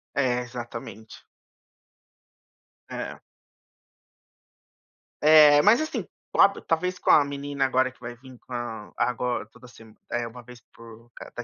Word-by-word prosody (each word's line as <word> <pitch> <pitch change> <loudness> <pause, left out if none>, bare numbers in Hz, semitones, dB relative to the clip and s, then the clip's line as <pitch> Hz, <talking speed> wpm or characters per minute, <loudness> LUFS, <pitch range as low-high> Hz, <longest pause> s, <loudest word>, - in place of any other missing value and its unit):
É, 125 -3 +1
exatamente. 120 -3 -9 1.7
É. - - -6 2.0
É, 150 -1 +7
mas, 220 +6 +5
assim, 310 - -3 0.3
com - - +3
a 200 - +8
talvez 180 +3 -1
com - - +2
a 150 - +7
menina 140 -1 -3
agora 130 0 +1
que - - -27
vai 120 0 -8
vir 130 +1 -15
com 125 - -13
a 115 -3 -6
ago 125 -1 -1
toda 125 +2 -16
se 120 - -16 0.3
eh, 120 0 -2
uma 125 +2 -11
vez 125 -1 -14
por 115 0 -15
cada 120 - -9
125 Hz, 135 wpm, -25 LUFS, 120-140 Hz, 2.0 s, a